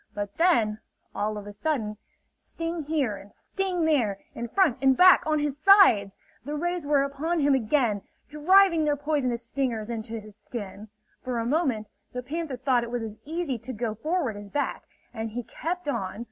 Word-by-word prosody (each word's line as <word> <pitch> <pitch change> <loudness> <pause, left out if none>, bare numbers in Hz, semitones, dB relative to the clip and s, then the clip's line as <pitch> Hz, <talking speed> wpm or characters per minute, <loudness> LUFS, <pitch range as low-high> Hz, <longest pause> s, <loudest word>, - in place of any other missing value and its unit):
But 205 -1 -5
then, 230 -12 +3 0.3
all 215 +1 -2
of 205 - -7
a 205 - -8
sudden, 215 -3 -2 0.4
sting 330 -1 -5
here 280 -9 0
and 195 +1 -14
sting 370 -4 -2
there, 245 -11 +2 0.2
in 235 - -5
front, 290 - +2
in 265 -1 +5
back, 365 +6 +7
on 310 -1 +2
his 290 -1 -2
sides! 310 - +6 0.3
The 295 +4 -4
rays 350 0 -2
were 285 -2 +4
upon 285 +5 -2
him 290 -2 +3
again, 230 -4 +1 0.3
driving 335 +2 +4
their 295 -1 +2
poisonous 275 -5 -1
stingers 235 -3 -2
into 225 0 -5
his 210 -1 -13
skin. 210 -1 -8 0.4
For 250 -2 -2
a 230 - -1
moment, 245 -7 0 0.2
the 250 0 -4
panther 300 0 -4
thought 255 -1 +2
it 235 - -5
was 240 -1 -3
as 220 -1 -7
easy 315 -5 -3
to 255 +4 -7
go 225 -1 -2
forward 290 - -1
as 205 0 -9
back, 285 +6 -2 0.3
and 225 -1 -4
he 240 +3 -5
kept 340 +8 -5
on. 215 -8 -3
260 Hz, 185 wpm, -26 LUFS, 220-310 Hz, 0.4 s, back